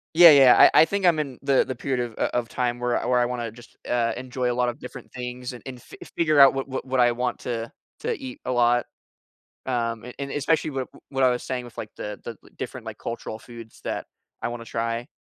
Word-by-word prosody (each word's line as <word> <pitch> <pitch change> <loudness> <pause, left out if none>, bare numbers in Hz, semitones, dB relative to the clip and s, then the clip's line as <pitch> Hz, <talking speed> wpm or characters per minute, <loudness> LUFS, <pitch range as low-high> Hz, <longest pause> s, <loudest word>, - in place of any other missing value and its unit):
Yeah, 170 -1 +10
yeah, 135 -3 +8 0.2
I - - +8
I - - +7
think 200 0 -1
I'm 165 -3 +4
in 135 -4 -4
the 140 -1 +4
the 130 - -5
period 130 +1 -2
of 120 -2 -3
o - - +1
of 115 - -6
time 120 -1 -1
where 125 0 +1
I - - -5
where 125 -1 +3
I 120 - +3
wanna 120 -2 -3
just, 120 +1 -16
uh, 115 -2 +1
enjoy 125 -1 -2
a - - 0
lot 125 0 +1
of 120 - -4
different 125 - -10
things 125 0 -6
and 120 - -10
and 125 -2 -7
fi - - -14 0.2
figure 155 -3 +3
out 135 -1 +9
what 135 0 -2
what 130 - -4
what 130 0 -1
I 120 -1 +5
want 125 0 -2
to 115 -1 -4 0.3
to - - -2
eat 130 -1 -8
a 130 - -1
lot, 120 0 +3 0.8
um, 115 -3 -1
and 125 - -9
and 140 0 -4
especially 155 +1 +1
wi 135 -2 -3
w - - -18
what 135 -1 -1
I 130 - +6
was 125 - -1
saying 125 -1 -3
with, 120 - -14
like, 105 - -6
the 105 0 -6
the - - -4
li - - -19
different, - - -6
like, - - -6
cultural 115 -1 -6
foods 115 -1 -12
that - - -3 0.3
I - - -2
wanna 120 -1 -6
try. 115 +1 -3
125 Hz, 255 wpm, -25 LUFS, 120-130 Hz, 0.8 s, Yeah